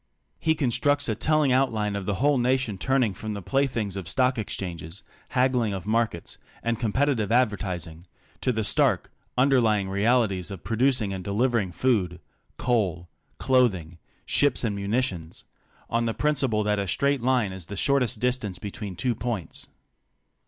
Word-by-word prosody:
He 160 0 +2
constructs 145 +1 +1
a 110 - +1
telling 150 +5 +2
outline 110 -6 +1
of 100 0 -3
a 100 - 0
whole 140 +4 +2
nation 125 -5 0
turning 130 -4 +1
from 110 +2 -5
the 100 - -5
play 135 +5 +2
things 110 -7 -3
of 95 -4 -5
stock 125 +1 +2
exchanges, 90 -3 -5 0.3
haggling 125 -5 +1
of 95 - -6
markets, 110 -5 -1 0.2
and 115 -1 -1
com 115 -4 -1
petitive 130 -5 +1
advertising, 95 -8 -1 0.3
to 130 - +2
the 110 -2 -1
stark, - - +1 0.3
underlying 115 -7 +3
realities 100 -2 +1
of 95 -3 -8
pro 115 - -2
ducing 120 -5 +2
and 95 -1 -5
delivering 110 -1 0
food, 90 -5 0 0.4
coal, 95 -8 0 0.3
clothing, 95 -11 +1 0.3
ships 140 -3 +2
and 110 -4 0
muni 100 +6 0
tions 85 -9 -5 0.2
— - - -32
on 115 0 0
the 115 - -2
principle 135 -6 +1
that 105 0 +1
a 100 - -2
straight 140 +8 +1
line 125 -5 +2
is 95 -3 -7
the 100 - -7
shortest 125 -2 +1
distance 120 -6 -1
between 100 0 -6
two 125 +6 0
points. 105 -6 -4
110 Hz, 165 wpm, -26 LUFS, 100-130 Hz, 0.4 s, underlying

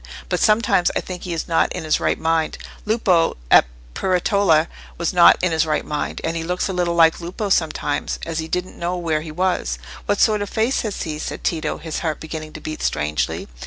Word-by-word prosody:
But - - 0
sometimes 215 -5 +3
I - - +2
think 180 -1 -7
he 175 - -3
is 165 - -3
not 165 -2 +2
in - - -5
his 155 -1 +1
right - - +1
mind: 160 -1 0 0.3
Lupo, 190 - +2
at - - +8 0.3
Peretola, 180 - +2 0.3
was 170 +1 -1
not 175 -1 +7
in 185 - +2
his 160 0 +1
right 150 -1 0
mind, 150 -1 -3
and 165 +1 -1
he 165 - -2
looks 180 +2 -1
a 190 - -3
little 175 -1 0
like 165 0 +4
Lupo 185 +5 -4
sometimes, 160 -5 0
as 165 -1 -3
if - - 0
he 160 - -6
didn't 180 +2 -3
know 175 +1 -2
where 160 -3 -1
he 155 0 -7
was." 185 +3 -1 0.3
"What 205 0 +1
sort 215 -2 +3
of 205 - -3
face 225 +4 +1
has 215 -3 -3
he?" 155 -2 -4
said - - -5
Tito, 160 -2 -1
his 160 0 -5
heart 160 -3 -2
beginning 155 -1 -7
to - - -7
beat 155 - -6
strangely. 75 +1 -1
170 Hz, 220 wpm, -21 LUFS, 160-185 Hz, 0.3 s, at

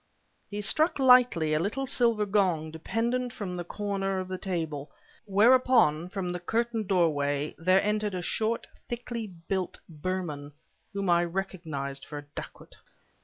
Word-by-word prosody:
He 205 0 -4
struck 315 - +3
lightly 250 - +5
a 155 - +3
little 215 +10 -1
silver 235 -4 +2
gong, 185 -6 +1
dependent 235 +9 -1
from 200 -6 -5
the 175 -1 -3
corner 195 +1 -2
of 185 0 -4
the 185 0 -4
table, 160 -6 -3 0.4
whereupon, 210 -6 +4
from 185 -2 -3
the 180 - -3
curtained 225 +3 -1
doorway, 150 -6 +1
there 185 +3 +4
entered 210 -1 0
a 180 - -3
short, 225 +4 0 0.2
thickly 235 -1 -4
built 185 0 -4
Burman 155 -3 -4 0.4
whom 200 -2 -3
I 175 0 +4
recognized 165 -7 -4
for 150 - -7
a 145 - -8
dacoit. - - -9
190 Hz, 145 wpm, -28 LUFS, 165-220 Hz, 0.4 s, lightly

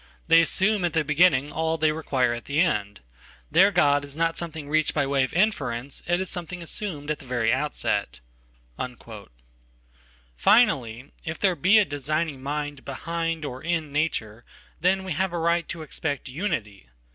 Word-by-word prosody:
They 165 0 +6
assume 190 +4 +1
at 175 -3 0
the 160 -1 +2
beginning 150 -2 +3
all 160 +1 -1
they 155 0 +2
require 135 -6 0
at 120 - -7
the 145 +2 -1
end. 105 - 0 0.5
Their 185 +5 +6
God 145 -7 +3
is 140 +1 -8
not 165 0 +1
something 160 -3 -5
reached 155 +1 +1
by 145 -2 +2
way 135 -1 +2
of 130 - -2
inference, 140 - 0
it 175 +1 +2
is 190 - -2
something 175 0 -5
assumed 155 -5 -3
at 150 - -3
the - - -13
very 120 -2 +1
outset." 135 - -1 2.2
Finally, 140 - +3
if 160 -1 -4
there 190 -3 +2
be 185 +6 +5
a 210 - +5
designing 145 0 -2
mind 145 0 -4
behind 165 +3 -3
or 130 -2 -6
in 165 -3 -2
nature, 120 -7 -2 0.4
then 190 +3 +2
we 190 - -6
have 185 +3 -1
a - - -1
right 170 +1 +1
to 165 -2 -5
expect 145 -1 -4
unity. 125 - -4
155 Hz, 170 wpm, -25 LUFS, 140-170 Hz, 2.2 s, They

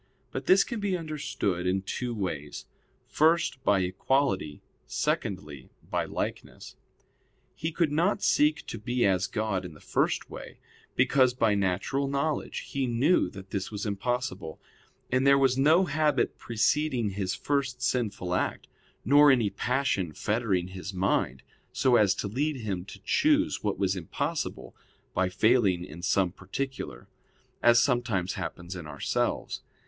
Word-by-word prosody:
But - - -5
this 190 +1 +6
can 235 -3 -5
be 200 -3 0
understood 145 - -2
in 95 +1 0
two 120 +5 -3
ways: 80 -8 -4 0.4
first, 160 -3 +2
by 100 -6 +3
equality; 95 - 0 0.2
secondly, 75 -9 -3 0.2
by - - 0
likeness. - - -5 0.8
He 160 - -3
could 165 -2 +1
not 175 +7 +1
seek 150 +1 +3
to 115 - -6
be 120 +3 0
as 95 -1 +2
God 100 -2 -2
in 85 -4 -9
the - - -15
first - - 0
way; - - -10 0.4
because 130 -2 +3
by 115 -4 +3
natural 100 +8 0
knowledge 140 +2 -2
he 135 -2 -3
knew 130 +9 +2
that 95 -1 -11
this 95 -2 -3
was 105 0 -5
impossible: 100 -4 -3 0.5
and 130 +2 +2
there 140 0 +7
was 135 -2 +3
no 155 +7 +4
habit 150 -4 +1
preceding 120 0 +1
his 95 0 -2
first 135 -3 -1
sinful 105 -8 -1
act, 90 - -1 0.4
nor 145 +4 +7
any 120 -7 +3
passion 125 - -1
fettering 100 -3 -1
his 95 +1 -7
mind, 90 -9 0 0.3
so 130 -2 +3
as 100 -4 +4
to 100 - -3
lead 145 +8 -1
him 100 -7 -4
to 100 - -11
choose 300 - +2
what 105 -2 -1
was 95 -1 +1
impossible 80 -7 -4 0.4
by 95 0 +1
failing 100 -3 +2
in 80 +2 -10
some 95 0 +2
particular; 95 - -6 0.5
as 120 0 +6
sometimes 120 -8 +1
happens 85 +2 -6
in 85 -4 -7
ourselves. 70 -2 -2
110 Hz, 145 wpm, -28 LUFS, 95-140 Hz, 0.8 s, there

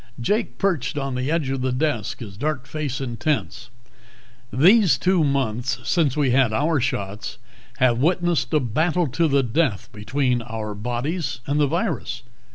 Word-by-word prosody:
Jake 210 - -1
perched 155 -9 0
on 135 -2 -2
the 125 +2 -2
edge 155 -4 0
of 135 -1 -2
the 130 0 0
desk, 125 -4 -1
his 100 -5 -8
dark 140 +3 -2
face 145 -2 -4
intense. 130 -1 -2 0.8
"These 180 - +5
two 180 0 +2
months 130 -3 0
since 155 -6 +1
we 140 -4 +2
had 130 -2 +3
our 145 +7 +1
shots 100 -3 -3 0.4
have 120 -2 +3
witnessed 170 -3 +1
a 155 - +4
battle 160 +8 +1
to 160 +6 +1
the 140 -2 +3
death 120 -3 0
between 125 +3 0
our 110 -2 -5
bodies 125 - -3
and 145 +1 0
the 145 - +4
virus. 170 +6 -2
135 Hz, 160 wpm, -23 LUFS, 120-155 Hz, 0.8 s, These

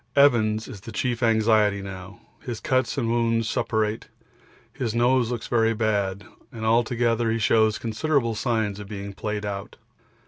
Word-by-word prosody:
Evans 110 -6 +4
is 100 - -9
the 115 - -9
chief 120 0 -2
anxiety 110 -3 +3
now; 95 0 -9 0.2
his 120 -3 -6
cuts 130 0 0
and 120 -4 0
wounds 115 -1 +1
suppurate, 110 -1 -1 0.7
his 120 -5 -3
nose 120 0 +3
looks 120 -2 -4
very 115 -1 +2
bad, 105 -3 -1 0.3
and 110 -3 -6
altogether 115 0 +2
he 115 - +1
shows 110 -1 +3
considerable 115 +2 0
signs 110 -3 -1
of 105 - -8
being 100 -1 -6
played 105 +1 -4
out. 100 -1 -5
110 Hz, 150 wpm, -24 LUFS, 105-120 Hz, 0.7 s, Evans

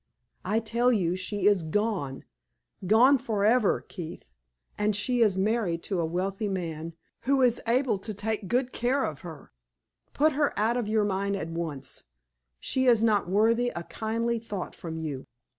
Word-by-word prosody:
I 220 - +1
tell 235 +2 +1
you 180 -6 +1
she 190 +2 -3
is 205 -3 +5
gone 160 -5 -2 0.6
gone 250 +7 +6
forever, 220 0 +2
Keith; 165 - -8 0.4
and 210 0 0
she 245 +4 0
is 205 -4 +4
married 190 -4 0
to 190 -4 -2
a 165 - +1
wealthy 190 +5 -2
man, 165 -4 -4 0.3
who 270 0 +3
is 245 -2 +2
able 245 -3 +2
to 215 +3 -5
take 210 0 -3
good 250 +3 0
care 260 +4 +1
of 150 -3 -3
her. 160 -3 -10 0.6
Put 310 +2 +4
her 290 0 0
out 220 +3 +2
of 240 -4 -1
your 215 0 +2
mind 200 0 -1
at 165 -4 -4
once; 160 -6 -5 0.5
she 260 0 0
is 230 -3 +5
not 210 -5 +2
worthy 230 +5 +3
a 170 - -4
kindly 230 +4 -2
thought 210 -4 -6
from 165 -1 -7
you." 150 -5 -5
210 Hz, 165 wpm, -27 LUFS, 175-230 Hz, 0.6 s, gone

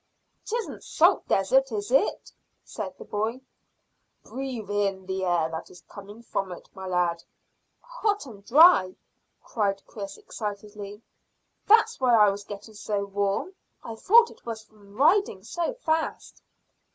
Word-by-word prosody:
"'Tisn't 465 +1 -4
salt - - +3
desert, 265 +7 +2
is 210 +1 -4
it?" 270 +10 +1 0.3
said - - -6
the 460 - -11
boy. 220 - -2 0.8
"Breathe 250 -6 -6
in 195 -2 -1
the 190 0 -3
air 175 -3 +2
that 160 - -6
is 180 - -15
coming 205 +3 -12
from 195 -4 -3
it, 175 - -10
my 190 -1 -8
lad." 175 -2 0 0.6
"Hot 445 -7 -2
and 210 -6 -12
dry," 260 - +6 0.5
cried 200 -3 -2
Chris 200 -2 -8
excitedly. 205 0 -7 0.6
"That's 445 +2 +5
why 250 -2 +4
I 210 -2 +6
was 200 +1 -6
getting 205 +2 -10
so 205 -1 -3
warm. 200 - -2 0.3
I 230 - -6
thought 455 - +5
it - - -18
was 225 -2 -6
from 205 -2 -20
riding 300 - +3
so 345 - -3
fast." 320 -10 -2
210 Hz, 140 wpm, -26 LUFS, 195-270 Hz, 0.8 s, dry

